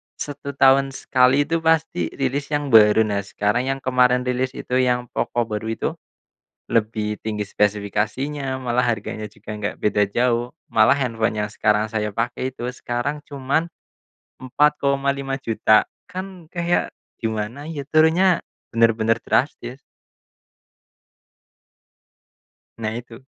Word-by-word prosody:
1 140 Hz, -1 st, -6 dB
tahun 135 Hz, 0 st, +4 dB
sekali 130 Hz, +2 st, +3 dB
itu 165 Hz, +2 st, -1 dB
pasti 160 Hz, -, +1 dB
rilis 140 Hz, +1 st, -1 dB
yang 145 Hz, -2 st, -1 dB
baru. 110 Hz, 0 st, +7 dB
Nah, 100 Hz, -2 st, -1 dB
sekarang 105 Hz, +5 st, -1 dB
yang 135 Hz, 0 st, -1 dB
kemarin 125 Hz, -1 st, +3 dB
rilis 125 Hz, +1 st, -1 dB
itu 125 Hz, +1 st, -1 dB
yang 125 Hz, -1 st, +1 dB
POCO 120 Hz, 0 st, 0 dB
baru 110 Hz, 0 st, -4 dB
itu, 115 Hz, -, -1 dB, 0.8 s
lebih 105 Hz, -1 st, 0 dB
tinggi 105 Hz, -2 st, -3 dB
spesifikasinya 110 Hz, +8 st, -1 dB
malah 125 Hz, -1 st, 0 dB
harganya 110 Hz, -1 st, -3 dB
juga 105 Hz, +1 st, -9 dB
nggak 105 Hz, -1 st, -3 dB
beda 105 Hz, 0 st, +2 dB
jauh, 120 Hz, +2 st, +1 dB, 0.2 s
malah 110 Hz, +6 st, +5 dB
handphone 115 Hz, -4 st, -1 dB
yang -, -, -7 dB
sekarang 105 Hz, 0 st, +2 dB
saya 105 Hz, -1 st, -2 dB
pakai 120 Hz, +4 st, -2 dB
itu 120 Hz, -1 st, -7 dB
sekarang 125 Hz, +5 st, -3 dB
cuman 140 Hz, +4 st, -1 dB, 0.7 s
Rp4.5000.000, 135 Hz, -4 st, +2 dB, 0.3 s
kan 185 Hz, -3 st, -7 dB
kayak 175 Hz, 0 st, 0 dB, 0.3 s
gimana 115 Hz, +6 st, -3 dB
ya, 150 Hz, -4 st, -4 dB
turunnya 165 Hz, +3 st, +4 dB, 0.3 s
bener-bener 115 Hz, 0 st, +3 dB
drastis. 130 Hz, -2 st, -1 dB, 3.0 s
Nah, 110 Hz, -1 st, -3 dB
itu. 120 Hz, +1 st, -10 dB
125 Hz, 120 wpm, -22 LUFS, 110-140 Hz, 3.0 s, baru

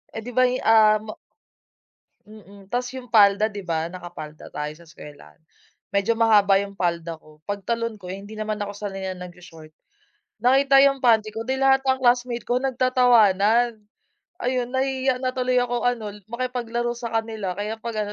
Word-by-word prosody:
Eh, 225 Hz, -, -4 dB
'di 245 Hz, -, -7 dB
ba'y, 255 Hz, +1 st, +2 dB
ah, 220 Hz, -1 st, +6 dB
m 215 Hz, -, -7 dB, 1.1 s
mm. 200 Hz, -2 st, -16 dB
Tapos 250 Hz, +1 st, -1 dB
'yung 250 Hz, -2 st, -9 dB
palda 210 Hz, 0 st, +5 dB
'di 205 Hz, -, -7 dB
ba, 165 Hz, +1 st, -2 dB
nakapalda 175 Hz, -4 st, -9 dB
tayo 150 Hz, 0 st, -5 dB
sa 170 Hz, +1 st, -18 dB
eskuwelahan, 145 Hz, -, -14 dB, 0.6 s
medyo 200 Hz, +3 st, +1 dB
mahaba 210 Hz, -3 st, +4 dB
'yung 200 Hz, 0 st, -9 dB
palda 170 Hz, -2 st, -2 dB
ko, 155 Hz, 0 st, -21 dB
pagtalon 215 Hz, +3 st, -3 dB
ko 180 Hz, -, -11 dB
hindi 200 Hz, +3 st, -8 dB
naman 215 Hz, 0 st, -2 dB
ako 205 Hz, -, -5 dB
sanay 195 Hz, -2 st, -5 dB
nag-sho-short 175 Hz, -3 st, -12 dB, 0.7 s
nakita 270 Hz, +2 st, +5 dB
'yung 275 Hz, -1 st, +4 dB
panty 225 Hz, -4 st, +3 dB
ko, 225 Hz, +2 st, -6 dB
'di 265 Hz, 0 st, -1 dB
lahat 270 Hz, 0 st, +4 dB
ang 260 Hz, 0 st, +1 dB
classmate 245 Hz, -1 st, +2 dB
ko 245 Hz, -, 0 dB
nagtatawanan. 240 Hz, -4 st, +3 dB, 0.6 s
Ayun, 250 Hz, -1 st, -1 dB
nahihiya 265 Hz, -1 st, 0 dB
na 255 Hz, 0 st, -2 dB
tuloy 255 Hz, 0 st, 0 dB
ako 245 Hz, -1 st, -1 dB
ano 230 Hz, -4 st, -1 dB
l 210 Hz, -, -15 dB
makipaglaro 240 Hz, -1 st, -3 dB
sa 235 Hz, -1 st, -6 dB
kanila, 215 Hz, -5 st, -4 dB
kaya 210 Hz, +2 st, -3 dB
'pag 215 Hz, -3 st, -3 dB
ano 205 Hz, -, -6 dB
220 Hz, 165 wpm, -23 LUFS, 195-245 Hz, 1.1 s, ah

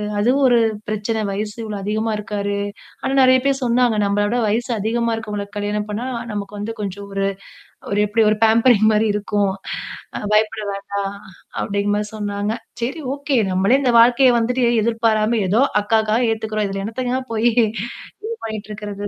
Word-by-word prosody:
அ -, -, -3 dB, 0.2 s
அதுவும் 250 Hz, +7 st, +2 dB
ஒரு 245 Hz, -1 st, +5 dB, 0.3 s
பிரச்சன. 215 Hz, +1 st, -1 dB
வயசு 210 Hz, +1 st, -3 dB
இவ்வளோ 215 Hz, -2 st, -5 dB
அதிகமா 215 Hz, +2 st, -1 dB
இருக்காரு. 205 Hz, -1 st, -3 dB, 0.4 s
ஆனா 270 Hz, -, -1 dB
நெறைய 260 Hz, 0 st, +6 dB
பேர் 275 Hz, 0 st, +1 dB
சொன்னாங்க. 240 Hz, -2 st, +2 dB
நம்மளோட 205 Hz, +3 st, +1 dB
வயசு 235 Hz, +4 st, 0 dB
அதிகமா 230 Hz, +3 st, 0 dB
இருக்கவங்களுக்கு 210 Hz, -2 st, -5 dB
கல்யாணம் 205 Hz, 0 st, -2 dB
பண்ணா, 210 Hz, +3 st, -3 dB, 0.3 s
நமக்கு 205 Hz, 0 st, -5 dB
வந்து 210 Hz, +2 st, -3 dB
கொஞ்சம் 200 Hz, 0 st, -5 dB
ஒரு 195 Hz, 0 st, -1 dB, 0.7 s
ஒரு 205 Hz, -, +1 dB
எப்படி 220 Hz, +2 st, +2 dB
ஒரு 215 Hz, -, +3 dB
பேம்பரிங் 225 Hz, -1 st, +4 dB
மாரி 215 Hz, +1 st, +2 dB
இருக்கும். 205 Hz, -1 st, 0 dB, 0.7 s
அ -, -, -3 dB
பயப்பட 215 Hz, 0 st, +2 dB
வேண்டாம். 200 Hz, 0 st, -4 dB, 0.4 s
அப்படிங்க 200 Hz, 0 st, -1 dB
மாரி 210 Hz, 0 st, -1 dB
சொன்னாங்க. 205 Hz, 0 st, -2 dB, 0.3 s
சரி 270 Hz, +7 st, -3 dB
ஓகே. 285 Hz, -1 st, -1 dB
நம்மளே 195 Hz, +8 st, +3 dB
இந்த 250 Hz, -3 st, +2 dB
வாழ்க்கைய 245 Hz, +2 st, +6 dB
வந்துட்டு 245 Hz, +2 st, +1 dB, 0.2 s
எதிர்பாராம 225 Hz, 0 st, +1 dB
ஏதோ 220 Hz, +6 st, +3 dB, 0.2 s
அக்காகாக 220 Hz, +2 st, +2 dB
ஏத்துக்கறோம். 215 Hz, -1 st, -2 dB
இ -, -, -6 dB
இதில 195 Hz, 0 st, -3 dB
எண்ணத்தங்க 250 Hz, +3 st, -2 dB
போய் 225 Hz, +2 st, +3 dB, 0.7 s
இது 450 Hz, +2 st, -4 dB
பண்ணிட்டு 215 Hz, -1 st, -6 dB
இருக்குறது. 205 Hz, -1 st, -5 dB
215 Hz, 160 wpm, -20 LUFS, 205-235 Hz, 0.7 s, நெறைய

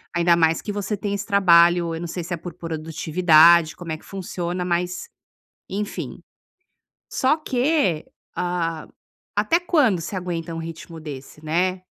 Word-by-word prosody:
Ainda 170 Hz, 0 st, +4 dB
mais 160 Hz, -1 st, +2 dB
que 210 Hz, -, -4 dB
você 205 Hz, +1 st, -2 dB
tem 200 Hz, +1 st, -3 dB
esse 200 Hz, +1 st, -3 dB
trabalho, 175 Hz, -4 st, +4 dB
eu 165 Hz, -, -5 dB
não 175 Hz, -, -4 dB
sei 175 Hz, +1 st, -5 dB
se 175 Hz, -, -5 dB
é 170 Hz, -, -2 dB
por 175 Hz, 0 st, -8 dB
produtividade, 160 Hz, 0 st, +4 dB
como 170 Hz, -3 st, -7 dB
é 155 Hz, -, -2 dB
que -, -, -20 dB
funciona, 180 Hz, -2 st, -4 dB
mas 180 Hz, -, -2 dB, 0.6 s
enfim. 205 Hz, +2 st, -4 dB, 0.9 s
Só 265 Hz, +4 st, +2 dB
que, 265 Hz, -, 0 dB, 0.3 s
ah, 170 Hz, -3 st, -2 dB, 0.5 s
até 335 Hz, -, +3 dB
quando 290 Hz, -, +2 dB
você 185 Hz, -, -5 dB
aguenta 170 Hz, -2 st, -4 dB
um -, -, -4 dB
ritmo 165 Hz, 0 st, -8 dB
desse, 150 Hz, 0 st, -9 dB
né, 180 Hz, +4 st, 0 dB
175 Hz, 155 wpm, -23 LUFS, 165-195 Hz, 0.9 s, Ainda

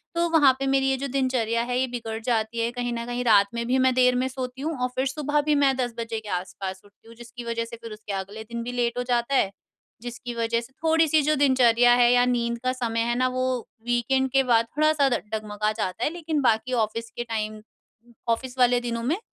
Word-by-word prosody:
तो 340 Hz, 0 st, +2 dB
वहाँ 295 Hz, -5 st, +5 dB
पे 275 Hz, -, -1 dB
मेरी 270 Hz, 0 st, +2 dB
ये 265 Hz, -, +1 dB
जो 275 Hz, +2 st, -3 dB
दिनचर्या 250 Hz, -4 st, 0 dB
है 245 Hz, +1 st, -2 dB
ये 260 Hz, -, +1 dB
बिगड़ 230 Hz, -2 st, -5 dB
जाती 225 Hz, -1 st, -1 dB
है, 230 Hz, +1 st, 0 dB
कहीं 245 Hz, -1 st, -3 dB
न 235 Hz, 0 st, -4 dB
कहीं 245 Hz, +1 st, -3 dB
रात 205 Hz, -3 st, +5 dB
में 235 Hz, 0 st, -3 dB
भी 255 Hz, +2 st, +2 dB
मैं 260 Hz, 0 st, +3 dB
देर 250 Hz, 0 st, +4 dB
में 255 Hz, +1 st, +1 dB
सोती 260 Hz, 0 st, -6 dB
हूँ 320 Hz, +2 st, -2 dB
और 250 Hz, -, +2 dB
फिर 260 Hz, +1 st, 0 dB
सुबह 295 Hz, +1 st, 0 dB
भी 300 Hz, 0 st, +1 dB
मैं 280 Hz, -2 st, +3 dB
10 245 Hz, -2 st, -1 dB
बजे 230 Hz, -1 st, -3 dB
के 215 Hz, -1 st, -11 dB
आस-पास 190 Hz, +1 st, -4 dB
उठती 205 Hz, +2 st, -23 dB
हूँ 230 Hz, -, -14 dB
जिसकी 240 Hz, +1 st, -10 dB
वजह 230 Hz, 0 st, -2 dB
से 230 Hz, -, -9 dB
फिर 230 Hz, -, -8 dB
उसके 210 Hz, -1 st, -7 dB
अगले 195 Hz, +3 st, -5 dB
दिन 235 Hz, +1 st, -6 dB
भी 245 Hz, -, -4 dB
लेट 240 Hz, -1 st, -1 dB
हो 245 Hz, -, 0 dB
जाता 245 Hz, +2 st, 0 dB
है। 195 Hz, -7 st, +2 dB, 0.5 s
जिसकी 240 Hz, +1 st, -7 dB
वजह 230 Hz, 0 st, 0 dB
से 240 Hz, +3 st, -14 dB
थोड़ी-सी 320 Hz, -1 st, +3 dB
जो 305 Hz, +2 st, +2 dB
दिनचर्या 245 Hz, -4 st, +4 dB
है 245 Hz, -1 st, +5 dB
या 245 Hz, 0 st, +4 dB
नींद 235 Hz, -1 st, 0 dB
का 255 Hz, -, +1 dB
समय 230 Hz, -3 st, -2 dB
है 240 Hz, -, +1 dB
ना 255 Hz, 0 st, +2 dB
वो 255 Hz, -, +1 dB, 0.4 s
वीकेंड 265 Hz, +2 st, +1 dB
के 270 Hz, 0 st, +4 dB
बाद 230 Hz, -2 st, +3 dB
थोड़ा-सा 305 Hz, -2 st, +3 dB
ड 240 Hz, -, +1 dB
डगमगा 215 Hz, 0 st, -2 dB
जाता 190 Hz, -4 st, -3 dB
है, -, -, +2 dB
लेकिन 320 Hz, -3 st, -2 dB
बाकी 250 Hz, 0 st, +1 dB
ऑफिस 230 Hz, +2 st, -7 dB
के 240 Hz, -, -5 dB
टाइम, 215 Hz, -2 st, -4 dB, 0.7 s
ऑफिस 250 Hz, +2 st, -2 dB
वाले 245 Hz, 0 st, +4 dB
दिनों 230 Hz, 0 st, -3 dB
में -, -, -1 dB
245 Hz, 240 wpm, -25 LUFS, 230-260 Hz, 0.7 s, वहाँ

